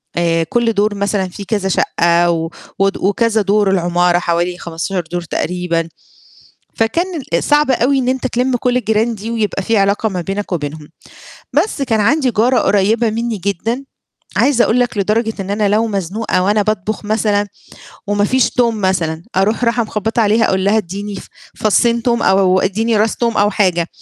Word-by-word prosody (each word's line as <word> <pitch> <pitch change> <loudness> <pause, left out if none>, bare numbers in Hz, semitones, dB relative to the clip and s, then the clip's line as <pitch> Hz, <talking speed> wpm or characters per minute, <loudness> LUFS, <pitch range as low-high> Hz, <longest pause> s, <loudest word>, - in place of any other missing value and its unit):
آآ 165 -1 +1
كل 230 +7 0
دور 205 0 +1
مثلًا 200 -1 -1
في 200 +3 -9
كذا 195 -1 -1
شَقّة 170 -1 +2
و 165 -1 -2 0.3
ود 195 0 +1
وكذا 220 +3 +1
دور 205 0 +2
العمارة 175 -1 +2
حوالي 175 +1 -1
15 175 +2 -4
دور 175 0 -2
تقريبًا، 170 -1 -2 0.9
فكان 225 +11 +1 0.3
ال 170 - +1
صعب 295 -1 +3
أو 255 +1 +2
إن 265 -2 +1
أنت 260 0 -1
تِلِم 250 +1 0
كل 245 +1 0
الجيران 225 0 +1
دي 220 +2 -7
ويبقى 215 -3 -1
في 225 +4 0
علاقة 200 +2 +2
ما 185 -4 -3
بينك 195 +3 -4
وبينهم. 150 -2 -4 0.6
بس 410 -9 0
كان 225 -5 +1
عندي 265 +5 +2
جارة 240 +3 +2
قريّبة 215 +3 +2
منّي 230 0 -2
جدًا، 200 +7 -2 0.5
عايزة 260 -4 +3
أقول 235 - +2
لك 245 -2 0
لدرجة 220 +3 0
إن 195 - -7
أنا 205 0 +1
لو 220 +3 +2
مزنوقة 195 -1 -1
وأنا 210 +2 +2
باطبُخ 215 0 -2
مثلًا 210 -1 0 0.6
وما 205 0 +1
فيش 260 +4 +2
توم 235 -3 0
مثلًا 170 -4 -1
أروح 215 +5 +1
راحة 235 0 +2
مخبَّطة 220 +2 -2
عليها 220 +1 +3
أقول 190 0 0
لها: 205 +2 +3
"إدّيني 200 +1 -4
ف - - -9 0.3
فصّين 235 +2 +2
توم 235 -1 +1
أو 190 -1 +3
إدّيني 220 +4 0
راس 215 +1 +1
توم 235 -1 0
أو 205 0 +3
حاجة." 180 -5 +1
205 Hz, 175 wpm, -16 LUFS, 185-230 Hz, 0.9 s, صعب